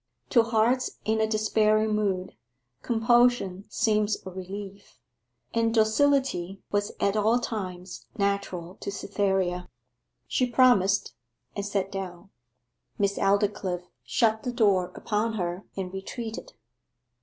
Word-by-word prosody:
To 240 - +6
hearts 230 +3 +1
in 220 0 +1
a 220 - +2
despairing 215 0 +2
mood, 195 -3 -1 0.5
compulsion 235 -4 +2
seems 210 -1 +1
a 190 - -6
relief; 195 +2 -8 0.6
and 230 0 +2
docility 220 -4 +2
was 205 0 0
at 200 +1 +1
all 215 +3 +3
times 185 -6 -5
natural 200 -3 -2
to - - -4
Cytherea. 190 -3 -1 0.6
She 250 -1 +1
promised, 225 -6 +4 0.4
and 200 - -2
sat 200 -1 -2
down. 190 -1 -6 0.7
Miss 200 0 0
Aldclyffe 195 -3 +1 0.2
shut 220 -1 +1
the 250 - -3
door 200 -7 +2
upon 220 +1 -1
her 180 -2 -3
and 185 -1 -4
retreated. 220 +4 -6
205 Hz, 115 wpm, -27 LUFS, 190-225 Hz, 0.7 s, To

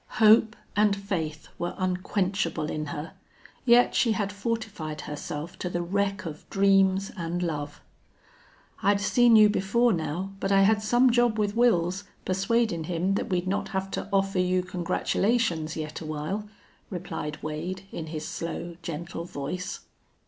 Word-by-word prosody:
Hope 220 +1 +6 0.2
and 205 0 +4
faith 170 -6 -4
were 175 0 -2
unquenchable 185 -3 -1
in 155 0 -3
her, 150 +3 -6 0.5
yet 245 0 +6
she 230 -3 +3
had 205 -2 -1
fortified 200 -8 -3
herself 150 +2 -6
to 180 - -2
the 175 0 -2
wreck 195 +1 -1
of 155 -2 -8
dreams 195 0 +3
and 175 -1 -2
love. 145 -3 -4 1.0
"I'd 200 0 +3
seen 235 +4 +5
you 215 -1 +8
before 210 +4 +2
now, 175 +3 -3
but 195 - -1
I 195 0 +6
had 215 +2 +4
some 240 +4 +4
job 240 -2 +3
with 205 -1 0
Wils, 195 -5 +2 0.2
persuadin' 195 -2 +1
him 180 +3 0
that - - -2
we'd 180 -1 0
not 195 +2 -1
have 190 -1 -3
to 200 - -4
offer 195 -1 +1
you 180 0 +2
congratulations 180 -1 0
yet 155 0 -5
awhile," 155 +7 -4 0.4
replied 165 -5 -5
Wade, 170 +5 -4
in 160 - -5
his 155 -1 -5
slow, 170 0 -5
gentle 170 +1 -5
voice. 180 +4 -5
185 Hz, 150 wpm, -27 LUFS, 165-205 Hz, 1.0 s, you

